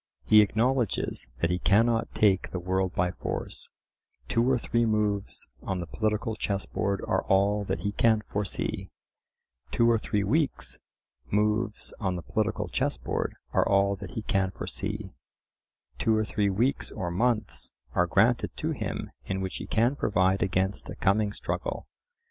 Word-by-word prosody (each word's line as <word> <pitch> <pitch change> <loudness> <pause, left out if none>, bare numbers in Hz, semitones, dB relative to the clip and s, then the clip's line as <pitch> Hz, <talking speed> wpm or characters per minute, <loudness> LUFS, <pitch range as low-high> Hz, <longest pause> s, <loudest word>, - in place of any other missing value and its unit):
He 110 0 +8
acknowledges 115 - 0
that 85 - +2
he 90 - 0
cannot 115 +4 +2
take 100 -3 +3
the - - -4
world 95 +1 -1
by 90 0 +1
force—two 115 +5 -4
or 130 - +4
three 115 0 0
moves 105 -3 0 0.2
on 95 -1 -2
the 85 - -3
political 110 +4 -1
chess 100 -2 -2
board 100 -2 -1
are - - +2
all 100 +2 +3
that 95 0 -2
he 100 - -1
can 110 0 +3
fore 105 - -1
see—two 95 - -3
or 115 - +3
three 105 -2 0
weeks 145 +9 0 0.5
moves 105 +1 0
on 95 -4 -1
the 85 - -5
political - - -1
chessboard - - -1 0.2
are - - +3
all 100 0 +3
that - - -9
he 110 - -2
can 95 -2 +1
foresee—two 80 - -5
or 110 - +1
three 105 -1 +1
weeks 115 +8 +1
or 90 -5 -4
months 110 +1 0 0.2
are - - +3
granted - - +2
to - - -1
him - - -4
in 95 - -2
which 95 -1 -3
he - - -6
can 120 +5 +2
provide 95 -5 +2
against 95 0 0
a - - -5
coming 100 +1 +2
struggle. - - -4
105 Hz, 155 wpm, -28 LUFS, 95-110 Hz, 0.5 s, He